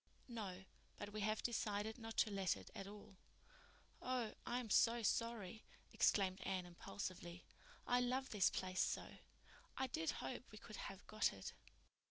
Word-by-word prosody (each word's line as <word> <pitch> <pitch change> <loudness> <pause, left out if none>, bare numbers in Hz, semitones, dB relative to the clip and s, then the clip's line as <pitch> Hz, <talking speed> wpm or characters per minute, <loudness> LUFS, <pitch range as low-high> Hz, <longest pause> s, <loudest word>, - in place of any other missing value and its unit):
"No, 200 -6 -4 0.3
but 205 0 -5
we 215 - -2
have 215 +1 +1
decided 220 -1 0
not 225 -1 -6
to 215 - +5
let 195 -2 +2
it - - -11
at 195 -3 -5
all." 205 -1 -10 0.8
"Oh, 250 -3 0
I'm 240 -3 0
so 235 +2 +6
sorry," 220 -2 +1 0.3
exclaimed 190 -2 +4
Anne 185 -2 0
impulsively. 175 -1 -5 0.4
"I 245 - +4
love 255 +2 +1
this 205 -4 +5
place 185 0 0
so. - - 0 0.6
I 265 - +2
did 320 +5 0
hope 250 0 -4
we 215 - -9
could 215 0 -8
have 195 0 -6
got 215 0 +3
it." 95 -1 -6
210 Hz, 155 wpm, -43 LUFS, 190-235 Hz, 0.8 s, so